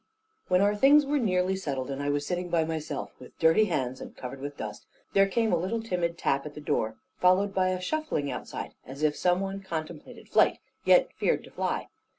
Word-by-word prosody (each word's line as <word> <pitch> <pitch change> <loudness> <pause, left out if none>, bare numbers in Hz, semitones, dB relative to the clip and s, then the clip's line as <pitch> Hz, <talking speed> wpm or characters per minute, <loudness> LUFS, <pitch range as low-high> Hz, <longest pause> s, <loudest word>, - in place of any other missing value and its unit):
When 180 0 +3
our 205 +1 +3
things 280 +6 +6
were 290 +1 +1
nearly 185 -4 +1
settled, 140 -7 -3
and 135 +1 -3
I 145 - -1
was 145 0 0
sitting 180 +1 -2
by 165 -2 +2
myself, 155 -3 -4
with 125 - -14
dirty 165 +7 +5
hands 130 -9 -2
and - - -9
covered 130 +1 -7
with 145 0 -6
dust, 105 -1 -7 0.3
there 195 0 +5
came 225 +1 +1
a - - +4
little 190 +7 -1
timid 175 -6 -2
tap 140 -3 +1
at 145 - -11
the - - -7
door, 110 -6 -1 0.2
followed 190 +2 +4
by 185 -1 +2
a 185 0 -1
shuffling 185 - -2
outside, - - -6
as 135 +4 -8
if 150 -1 +3
some 180 +1 +2
one 195 0 -3
contemplated 165 -4 -7
flight, - - +4 0.3
yet - - +5
feared - - 0
to - - -14
fly. - - -2
175 Hz, 210 wpm, -28 LUFS, 145-195 Hz, 0.3 s, things